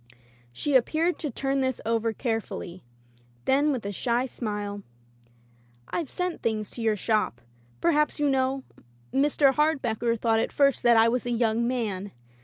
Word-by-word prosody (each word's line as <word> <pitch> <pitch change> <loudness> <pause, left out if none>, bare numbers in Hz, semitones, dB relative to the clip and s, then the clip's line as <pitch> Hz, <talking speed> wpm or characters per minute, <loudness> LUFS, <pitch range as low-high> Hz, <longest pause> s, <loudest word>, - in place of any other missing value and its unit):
She 280 - -2
appeared 315 +7 +2
to 305 - -3
turn 275 +2 -1
this 260 -2 0
over 225 0 +1
carefully; 220 -6 -4 0.6
then 285 +3 +3
with 250 -7 -3
a 200 - -2
shy 240 +5 0
smile: 205 -5 -4 1.1
"I've 335 -5 -3
sent 360 -1 -3
things 215 -2 -2
to 240 - -6
your 220 -1 +2
shop 210 - 0 0.2
— 120 0 -32
^perhaps 300 -3 +2
you 295 -1 +1
know? 265 0 +1 0.5
Mr. 275 0 +3
Hardbecker 240 -6 +1
thought 225 -1 +2
at - - -1
first 275 -2 +3
that 235 -1 +5
I 225 +1 +6
was 245 +1 0
a - - -1
young 230 0 +1
man. 205 -6 -2
240 Hz, 160 wpm, -26 LUFS, 220-275 Hz, 1.1 s, I